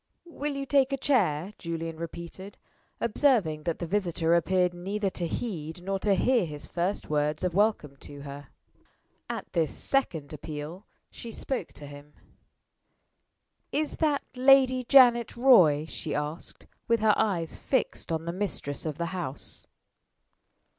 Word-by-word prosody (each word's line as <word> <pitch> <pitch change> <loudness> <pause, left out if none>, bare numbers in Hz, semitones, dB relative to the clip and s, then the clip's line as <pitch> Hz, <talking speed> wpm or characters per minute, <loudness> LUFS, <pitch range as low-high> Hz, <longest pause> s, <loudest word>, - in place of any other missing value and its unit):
"Will 295 -4 -4
you 275 0 -3
take 275 -1 +3
a 275 - 0
chair?" 200 - +1
Julian 165 -1 -4
repeated, 170 +4 -8 0.4
observing 210 - +2
that 170 -2 -1
the 175 - -4
visitor 170 -3 0
appeared 180 +1 +2
neither 195 +3 -2
to 175 -2 -3
heed 165 -4 -5
nor 195 +1 -2
to 200 0 +2
hear 245 +3 +3
his 150 -1 -7
first 180 +4 -2
words 150 +1 0
of 180 -2 0
welcome 200 -8 +1
to 145 +1 -10
her. 140 0 -9 0.8
At - - -6
this 165 -3 +1
second 160 - -1
appeal 155 +5 -7 0.2
she 230 - -8
spoke 265 +3 -3
to 145 - -10
him. 145 +1 -12 1.6
"Is 305 +1 -1
that 300 -3 +1
Lady 260 0 +5
Janet 240 -3 +5
Roy?" 180 - +6
she 160 - -4
asked, 150 +3 -5 0.2
with 230 -1 +2
her 215 -1 +5
eyes 170 -6 0
fixed 260 - -2
on 160 0 -2
the 170 - -3
mistress 170 -7 -3
of 155 -2 -4
the 170 - -2
house. 165 -7 -5
180 Hz, 145 wpm, -28 LUFS, 155-235 Hz, 1.6 s, Roy